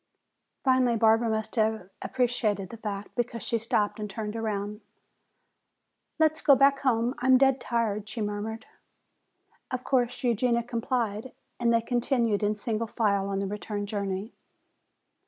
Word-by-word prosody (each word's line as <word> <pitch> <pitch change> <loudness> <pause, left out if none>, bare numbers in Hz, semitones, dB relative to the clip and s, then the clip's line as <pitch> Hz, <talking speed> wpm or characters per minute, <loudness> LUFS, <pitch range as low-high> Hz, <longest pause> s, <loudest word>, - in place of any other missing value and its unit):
Finally 255 -3 +3
Barbara 225 +1 +4
must 220 -1 -2
have 220 -4 +1
appreciated 230 -6 0
the 230 - -8
fact, 205 -2 -5
because 235 -3 -3
she 230 - -1
stopped 215 -1 0
and 210 -1 -4
turned 210 +1 -5
around. 210 -1 -3 1.4
"Let's 315 -1 +2
go 280 - +6
back 275 +1 +4
home, 245 -2 +1
I 250 - -1
am 260 -1 +7
dead 270 -1 +3
tired," 215 -3 -1
she 220 - -6
murmured. 210 +2 -3 1.0
Of 255 -1 -3
course 250 -1 0
Eugenia 235 0 +2
complied, 235 -1 -2 0.3
and 235 -1 +2
they 230 0 +3
continued 235 -3 +1
in 210 0 +1
single 225 +1 -2
file 200 -4 +1
on 195 - -1
the 195 - -1
return 205 +1 -4
journey. 200 +1 -3
225 Hz, 145 wpm, -28 LUFS, 210-245 Hz, 1.4 s, am